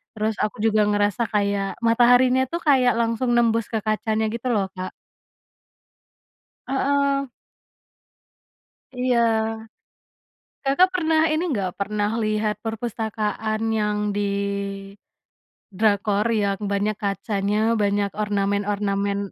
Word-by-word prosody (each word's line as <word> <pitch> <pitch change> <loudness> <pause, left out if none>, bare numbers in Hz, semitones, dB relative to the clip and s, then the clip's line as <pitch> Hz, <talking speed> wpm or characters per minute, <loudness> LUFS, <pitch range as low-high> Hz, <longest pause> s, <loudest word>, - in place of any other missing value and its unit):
Terus 215 0 -1
aku 210 0 -1
juga 215 -1 +3
ngerasa 205 +3 +1
kayak 200 -2 -1
mataharinya 245 +3 +4
tuh 340 +5 -4
kayak 260 -5 +4
langsung 235 +1 0
nembus 230 -2 +2
ke 220 -2 -1
kacanya 215 0 0
gitu 235 +2 -5
loh, 195 -3 0
Kak. 185 0 -6 1.8
Heeh. 275 0 +1 1.7
Iya, 250 -1 +2 1.5
Kakak 360 +8 +4
pernah 325 -3 +1
ini 310 +2 0
enggak? 200 - -1
Pernah 205 +1 -1
lihat 215 0 0
perpustakaan 220 -1 -3
yang 210 -1 0
di, 205 0 -1 1.5
drakor 205 +1 +1
yang 200 -3 0
banyak 200 +1 0
kacanya 205 +2 -1
banyak 200 0 +1
ornamen-ornamen? 200 -1 -1
215 Hz, 100 wpm, -23 LUFS, 205-240 Hz, 1.8 s, mataharinya